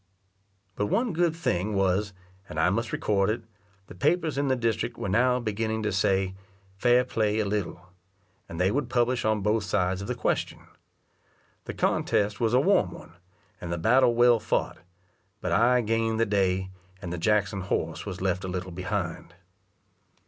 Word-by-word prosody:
But 105 Hz, -, -1 dB
one 235 Hz, -, 0 dB
good 170 Hz, -1 st, +1 dB
thing 110 Hz, -, -1 dB
was, 95 Hz, +2 st, +1 dB, 0.4 s
and 75 Hz, -, -4 dB
I 80 Hz, +3 st, +3 dB
must 115 Hz, +4 st, -1 dB
record 100 Hz, -1 st, +1 dB
it, 115 Hz, +2 st, -2 dB, 0.4 s
the -, -, -12 dB
papers 160 Hz, -, 0 dB
in 140 Hz, +1 st, 0 dB
the 130 Hz, -, +2 dB
district 115 Hz, -1 st, -1 dB
were -, -, -4 dB
now 125 Hz, +6 st, +2 dB
beginning 110 Hz, -1 st, -2 dB
to 105 Hz, -, 0 dB
say 95 Hz, -1 st, +1 dB, 0.4 s
"fair 125 Hz, +4 st, +3 dB
play 110 Hz, -3 st, 0 dB
a 110 Hz, -, +1 dB
little," 100 Hz, -3 st, -3 dB, 0.6 s
and 85 Hz, -, -7 dB
they 90 Hz, +2 st, +3 dB
would 135 Hz, 0 st, -1 dB
publish 120 Hz, 0 st, +1 dB
on 110 Hz, -1 st, +1 dB
both 105 Hz, +1 st, +1 dB
sides 95 Hz, -1 st, 0 dB
of 100 Hz, -, -6 dB
the -, -, -2 dB
question. -, -, -2 dB, 1.0 s
The -, -, -6 dB
contest 105 Hz, 0 st, 0 dB
was 115 Hz, 0 st, +2 dB
a -, -, +6 dB
warm 170 Hz, -, +3 dB
one, 85 Hz, -, -12 dB, 0.5 s
and 85 Hz, -, -5 dB
the 85 Hz, -, -1 dB
battle 120 Hz, +6 st, +4 dB
well 120 Hz, -1 st, +5 dB
fought; 110 Hz, +2 st, -1 dB, 0.6 s
but -, -, -3 dB
I 125 Hz, +2 st, +4 dB
gained 115 Hz, 0 st, 0 dB
the 115 Hz, -, +3 dB
day, 95 Hz, -2 st, 0 dB, 0.3 s
and 90 Hz, -3 st, -6 dB
the 90 Hz, -, -4 dB
Jackson 100 Hz, +1 st, +1 dB
horse 95 Hz, -, -2 dB
was -, -, -6 dB
left 95 Hz, -1 st, -1 dB
a -, -, -4 dB
little 90 Hz, 0 st, -4 dB
behind. 90 Hz, -2 st, -4 dB
105 Hz, 175 wpm, -27 LUFS, 95-120 Hz, 1.0 s, a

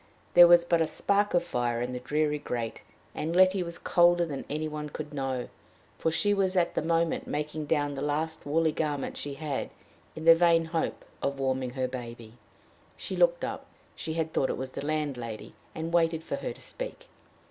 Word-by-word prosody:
There 175 Hz, 0 st, +10 dB
was 170 Hz, 0 st, +6 dB
but 170 Hz, -1 st, +2 dB
a 160 Hz, -, +2 dB
spark 200 Hz, +5 st, +1 dB
of 175 Hz, -, +3 dB
fire 120 Hz, -7 st, -1 dB
in 125 Hz, +1 st, -3 dB
the 125 Hz, -, -3 dB
dreary 150 Hz, +3 st, 0 dB
grate, 120 Hz, -5 st, -4 dB, 0.3 s
and 165 Hz, +3 st, -3 dB
Letty 185 Hz, +1 st, +5 dB
was 170 Hz, -1 st, -5 dB
colder 175 Hz, 0 st, +4 dB
than 145 Hz, -4 st, -5 dB
any 155 Hz, +2 st, -2 dB
one 150 Hz, -1 st, -5 dB
could 150 Hz, 0 st, -7 dB
know, 135 Hz, -3 st, -2 dB, 0.5 s
for -, -, +1 dB
she 205 Hz, +6 st, +2 dB
was 195 Hz, -2 st, +1 dB
at 175 Hz, -1 st, +2 dB
the -, -, 0 dB
moment 165 Hz, +1 st, 0 dB
making 150 Hz, 0 st, -3 dB
down 145 Hz, -2 st, +1 dB
the 135 Hz, -, -5 dB
last 155 Hz, +2 st, -2 dB
woolly 160 Hz, +2 st, +2 dB
garment 150 Hz, -2 st, -2 dB
she 145 Hz, -1 st, -5 dB
had, 145 Hz, -2 st, -3 dB, 0.5 s
in 160 Hz, -, -7 dB
the 165 Hz, -, +10 dB
vain 165 Hz, -1 st, +4 dB
hope 160 Hz, 0 st, -2 dB, 0.2 s
of 140 Hz, 0 st, -1 dB
warming 130 Hz, -1 st, 0 dB
her 130 Hz, -1 st, -1 dB
baby. 120 Hz, -3 st, -8 dB, 0.6 s
She -, -, -5 dB
looked -, -, +3 dB
up. -, -, -6 dB, 0.3 s
She 160 Hz, -, -4 dB
had 160 Hz, -1 st, -2 dB
thought 130 Hz, -, +1 dB
it -, -, -2 dB
was 130 Hz, 0 st, -5 dB
the -, -, -6 dB
landlady, 140 Hz, -7 st, -3 dB, 0.2 s
and 160 Hz, -, -3 dB
had 165 Hz, -, -5 dB
waited 165 Hz, -1 st, +2 dB
for -, -, -3 dB
her -, -, -4 dB
to -, -, -12 dB
speak. -, -, -7 dB
155 Hz, 200 wpm, -28 LUFS, 135-170 Hz, 0.6 s, There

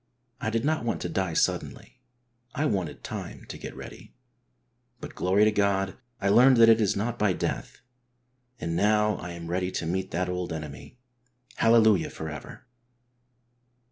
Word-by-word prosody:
I 110 Hz, -, -2 dB
did 115 Hz, +2 st, -1 dB
not 155 Hz, -2 st, +1 dB
want 115 Hz, -, -1 dB
to -, -, -3 dB
die 95 Hz, -3 st, -1 dB
suddenly; -, -, -1 dB, 0.6 s
I 150 Hz, -, 0 dB
wanted 95 Hz, -, -2 dB
time -, -, -7 dB
to -, -, -6 dB
get -, -, -8 dB
ready. -, -, -11 dB, 0.8 s
But, -, -, -8 dB
glory 95 Hz, +3 st, +2 dB
to 110 Hz, -, +4 dB
God, 100 Hz, -2 st, +1 dB, 0.2 s
I 100 Hz, -, -1 dB
learned 125 Hz, +5 st, +6 dB
that 115 Hz, 0 st, +7 dB
it 115 Hz, 0 st, +5 dB
is 105 Hz, -, +2 dB
not 115 Hz, +4 st, -2 dB
by 105 Hz, -3 st, +3 dB
death, -, -, -4 dB, 0.8 s
and 85 Hz, 0 st, -3 dB
now 105 Hz, +2 st, +2 dB
I 85 Hz, 0 st, -7 dB
am 85 Hz, -1 st, -8 dB
ready 90 Hz, +2 st, -1 dB
to -, -, -2 dB
meet 95 Hz, +3 st, -2 dB
that 90 Hz, +2 st, -1 dB
old 90 Hz, -1 st, -3 dB
enemy. 80 Hz, -, -8 dB, 0.6 s
Hallelujah 110 Hz, -5 st, +4 dB
for 80 Hz, -, -6 dB
ever 75 Hz, -2 st, -9 dB
100 Hz, 165 wpm, -27 LUFS, 90-110 Hz, 0.8 s, that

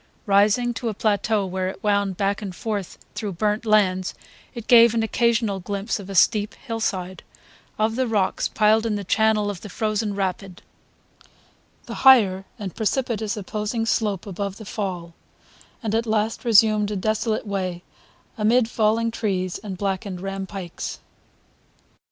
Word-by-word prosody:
Rising 210 Hz, +4 st, +3 dB
to 235 Hz, 0 st, -3 dB
a 215 Hz, -, -4 dB
plateau 210 Hz, 0 st, +1 dB
where 185 Hz, 0 st, -2 dB
it 190 Hz, -, -10 dB
wound 200 Hz, -3 st, +1 dB
back 200 Hz, +1 st, 0 dB
and 195 Hz, -4 st, -6 dB
forth 205 Hz, -4 st, -4 dB, 0.2 s
through 210 Hz, -3 st, -4 dB
burnt 210 Hz, +5 st, -1 dB
lands 190 Hz, -3 st, +2 dB, 0.4 s
it 235 Hz, -2 st, -7 dB
gave 235 Hz, -1 st, +7 dB
an 225 Hz, -, +1 dB
occasional 225 Hz, -3 st, +1 dB
glimpse 200 Hz, +4 st, -3 dB
of 195 Hz, -1 st, -5 dB
steep 210 Hz, +3 st, +3 dB
hillside, 200 Hz, -6 st, -3 dB, 0.6 s
of 220 Hz, +1 st, +1 dB
the 260 Hz, 0 st, 0 dB
rocks 210 Hz, -4 st, 0 dB
piled 220 Hz, +1 st, +3 dB
in 215 Hz, -, 0 dB
the 205 Hz, -, -3 dB
channel 215 Hz, +1 st, +2 dB
of 195 Hz, -, -9 dB
the 210 Hz, -, -9 dB
frozen 215 Hz, +1 st, -1 dB
rapid, 190 Hz, -1 st, -4 dB, 1.2 s
the -, -, -7 dB
higher 205 Hz, -8 st, +6 dB
and 200 Hz, -5 st, -6 dB
precipitous 225 Hz, -1 st, -1 dB
opposing 210 Hz, +3 st, -3 dB
slope 210 Hz, -5 st, 0 dB
above 200 Hz, 0 st, -4 dB
the 220 Hz, -, -10 dB
fall, 180 Hz, -5 st, -4 dB, 0.7 s
and 220 Hz, -2 st, -2 dB
at 225 Hz, +1 st, +1 dB
the -, -, -6 dB
last 220 Hz, +1 st, 0 dB
resumed 215 Hz, -2 st, +4 dB
a 210 Hz, -, -3 dB
desolate 215 Hz, +3 st, -1 dB
way 185 Hz, -3 st, -3 dB, 0.6 s
amid 225 Hz, +2 st, +3 dB
fallen 230 Hz, +1 st, +1 dB
trees 185 Hz, -5 st, -2 dB
and 195 Hz, -4 st, -7 dB
blackened 195 Hz, -1 st, -3 dB
rampikes. 195 Hz, -1 st, -5 dB
210 Hz, 150 wpm, -23 LUFS, 195-220 Hz, 1.2 s, gave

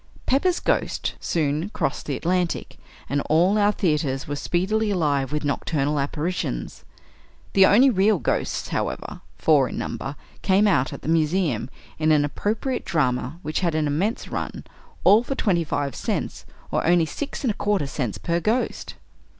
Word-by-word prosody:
"Pepper's 345 Hz, +7 st, +2 dB
Ghost" -, -, 0 dB
soon 155 Hz, +2 st, -1 dB
crossed -, -, -3 dB
the 140 Hz, -3 st, -1 dB
Atlantic, 175 Hz, +2 st, -1 dB, 0.3 s
and 140 Hz, +2 st, 0 dB
all 180 Hz, +7 st, +4 dB
our 205 Hz, 0 st, +4 dB
theatres 150 Hz, -9 st, -1 dB
were 145 Hz, -, -2 dB
speedily 190 Hz, +8 st, 0 dB
alive 145 Hz, -8 st, +1 dB
with 150 Hz, 0 st, -2 dB
nocturnal 145 Hz, +1 st, 0 dB
apparitions. 145 Hz, -, -3 dB, 0.7 s
The 190 Hz, -1 st, +7 dB
only 255 Hz, +6 st, +6 dB
real 200 Hz, 0 st, +3 dB
ghosts, -, -, -2 dB
however -, -, -3 dB, 0.2 s
four 145 Hz, -5 st, +3 dB
in -, -, -6 dB
number 135 Hz, +2 st, -4 dB, 0.3 s
came 195 Hz, +2 st, +3 dB
out 145 Hz, -11 st, +2 dB
at -, -, -8 dB
the -, -, -6 dB
Museum, 160 Hz, -, +1 dB, 0.3 s
in 155 Hz, 0 st, +3 dB
an 150 Hz, -1 st, +4 dB
appropriate 225 Hz, -, -2 dB
drama, 130 Hz, -1 st, 0 dB
which 155 Hz, +1 st, -1 dB
had 170 Hz, -4 st, 0 dB
an 155 Hz, -1 st, +1 dB
immense 170 Hz, +10 st, -1 dB
run -, -, -4 dB, 0.4 s
"all 210 Hz, +3 st, +7 dB
for 270 Hz, +3 st, -4 dB
twenty 180 Hz, -9 st, +1 dB
five 145 Hz, -2 st, -2 dB
cents," -, -, -3 dB, 0.2 s
or -, -, 0 dB
only 170 Hz, 0 st, +4 dB
six 280 Hz, -, -5 dB
and 250 Hz, -, +2 dB
a -, -, -6 dB
quarter 205 Hz, -7 st, 0 dB
cents 125 Hz, -7 st, -3 dB
per 170 Hz, +10 st, -1 dB
ghost! 220 Hz, +8 st, -1 dB
165 Hz, 160 wpm, -24 LUFS, 145-200 Hz, 0.7 s, The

